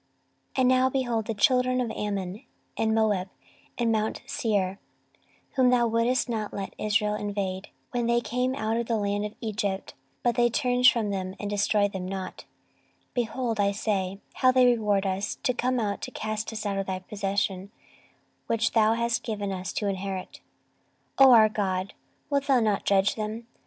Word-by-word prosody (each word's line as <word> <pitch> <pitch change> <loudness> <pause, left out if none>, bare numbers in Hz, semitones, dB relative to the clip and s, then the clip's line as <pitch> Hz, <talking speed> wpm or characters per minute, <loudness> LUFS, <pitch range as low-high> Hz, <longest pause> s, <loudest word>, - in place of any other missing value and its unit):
14:020:010 - - -1
And 255 - +4
now, 255 0 +4
behold, 240 -4 -1
the 225 - -1
children 255 +3 +3
of 240 -3 -1
Ammon 200 +1 -4 0.3
and 220 0 +1
Moab 205 -4 +1 0.5
and 235 -2 +1
mount 220 +1 -1
Seir, 205 -8 -1 0.7
whom 260 -2 +3
thou 245 -1 +4
wouldest 230 +3 +1
not 220 -3 -3
let 195 -1 -5
Israel 210 0 +1
invade, 200 -2 -3 0.2
when 240 -2 -1
they 235 0 +3
came 250 +3 -1
out 225 -4 -1
of 235 -1 -2
the 230 - +1
land 205 0 -1
of 210 - -14
Egypt, 205 -3 -3 0.3
but 240 - +3
they 240 0 +3
turned 250 0 +3
from 225 -5 +3
them, 190 -1 -3
and 205 0 -4
destroyed 205 0 +2
them 185 -1 -4
not; 190 -1 -6 0.6
14:020:011 - - -44
Behold, 240 -1 -2
I 200 0 +3
say, 195 -2 -2
how 255 - +4
they 255 0 +5
reward 210 -5 +2
us, 190 +1 -1
to 250 - +2
come 250 +1 0
to 205 -4 -2
cast 215 0 -4
us 220 -1 -5
out 200 -1 -1
of 195 - -3
thy 190 -1 -2
possession, 195 0 -2 0.8
which 230 0 +1
thou 220 -1 +4
hast 235 0 0
given 205 -3 -3
us 185 -1 -4
to 210 - -2
inherit. 190 -1 -4 0.8
14:020:012 270 - +9
O - - +8
our 220 -3 +7
God, 195 -2 -2 0.4
wilt 280 -1 +1
thou 270 -3 +5
not 215 -3 0
judge 195 0 +3
them? 220 +1 -5
215 Hz, 180 wpm, -27 LUFS, 200-240 Hz, 0.8 s, 14:020:012